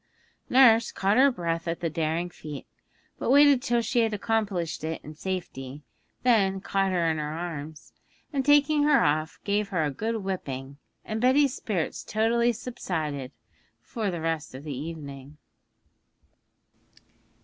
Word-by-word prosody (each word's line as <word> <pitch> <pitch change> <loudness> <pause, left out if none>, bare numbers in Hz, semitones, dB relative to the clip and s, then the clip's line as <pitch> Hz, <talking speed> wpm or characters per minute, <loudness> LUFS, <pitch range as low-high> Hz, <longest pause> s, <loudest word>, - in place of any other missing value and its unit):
Nurse 235 -3 +6
caught 200 +3 +1
her 275 +2 +6
breath 170 -5 -3
at 165 0 -2
the 170 - -1
daring 165 +2 -2
feat, 150 -4 -8 0.5
but - - -2
waited 285 -1 +6
till 240 -3 +1
she 240 +3 0
had 225 -2 +2
accomplished 200 -8 -1
it 160 +1 -3
in 155 - -9
safety, 150 -6 -5 0.4
then 200 -6 +3
caught 195 0 0
her 175 -2 +1
in 155 - -2
her 150 0 -3
arms, 160 -2 -6 0.4
and 275 -1 0
taking 290 +1 +4
her 290 -1 +4
off, 155 +2 0
gave 205 0 0
her 180 -5 0
a 150 - 0
good 225 +10 -2
whipping, 140 -7 -5 0.3
and 220 0 -3
Betty's 265 +2 +4
spirits 195 - -3
totally 235 +2 +2
subsided 160 - -4 0.5
for 220 -4 -3
the 170 -3 -4
rest 160 -4 -3
of 135 - -9
the 150 -3 -5
evening. 145 -1 -8
185 Hz, 150 wpm, -27 LUFS, 155-230 Hz, 0.5 s, Nurse